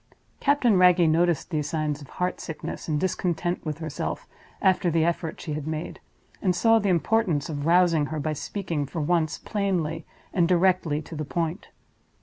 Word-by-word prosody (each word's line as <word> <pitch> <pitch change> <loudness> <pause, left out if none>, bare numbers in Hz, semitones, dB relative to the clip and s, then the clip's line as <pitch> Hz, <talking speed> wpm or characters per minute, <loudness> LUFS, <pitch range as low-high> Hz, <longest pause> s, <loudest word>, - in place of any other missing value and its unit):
Captain 250 -8 +3
Wragge 180 -2 +6
noticed 170 +1 +1
these 150 -2 -1
signs 150 -2 -2
of 140 - -12
heart 180 0 -1
sickness 160 - -6
and 150 -2 0
discontent 175 -1 -1
with 155 -3 -3
herself, 160 -3 -4 0.3
after 185 -2 +3
the 165 -1 +2
effort 165 -1 -2
she 155 - -5
had 150 0 -4
made, 155 +1 -4 0.4
and 185 -3 +1
saw 225 +4 +4
the 205 -2 0
importance 175 -3 +1
of 145 -1 -3
rousing 170 -3 +4
her 155 +1 -4
by 155 +1 -1
speaking, 165 -2 -3
for 160 - -5
once, 160 0 +1
plainly 175 -6 -2 0.3
and 175 -3 +3
directly 175 -4 +2
to 160 - -9
the 155 - -3
point. 165 +4 -3
165 Hz, 170 wpm, -26 LUFS, 155-180 Hz, 0.4 s, Wragge